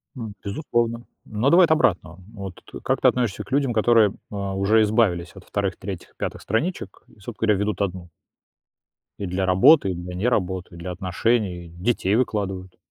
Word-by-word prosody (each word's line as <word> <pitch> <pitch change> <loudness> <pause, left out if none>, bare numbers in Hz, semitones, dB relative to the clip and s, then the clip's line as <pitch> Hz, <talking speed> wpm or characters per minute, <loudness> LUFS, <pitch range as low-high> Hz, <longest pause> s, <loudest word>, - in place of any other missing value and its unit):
М. 115 -5 -6
Безусловно. 115 +1 -1 0.2
Но 110 +5 0
давай 175 +4 +7
от 160 - -2
обратного. 90 - +1
Вот 100 -4 -7
т - - -10
как - - 0
ты - - +5
относишься 120 -6 -1
к - - -18
людям, 135 -2 +1
которые, 110 -1 +4 0.2
э, - - -6
уже 100 +2 +1
избавились 105 -6 +1
от 95 - -12
2, 100 -3 -2
3, 95 -2 -8
5 - - -4
страничек 155 - -3
и, - - -23
собственно 105 +3 -8
говоря, 105 - +4
ведут 105 0 -1
1? 90 -3 -3 1.1
И 100 - -3
для 95 +1 -2
работы, 100 - +6
и - - -4
для 90 +1 -7
не 95 +6 -1
работы, 95 -6 -1
и - - -11
для 90 +2 -6
отношений, 90 0 -1
детей 95 +3 0
выкладывают. 95 -6 -2
100 Hz, 180 wpm, -23 LUFS, 90-115 Hz, 1.1 s, давай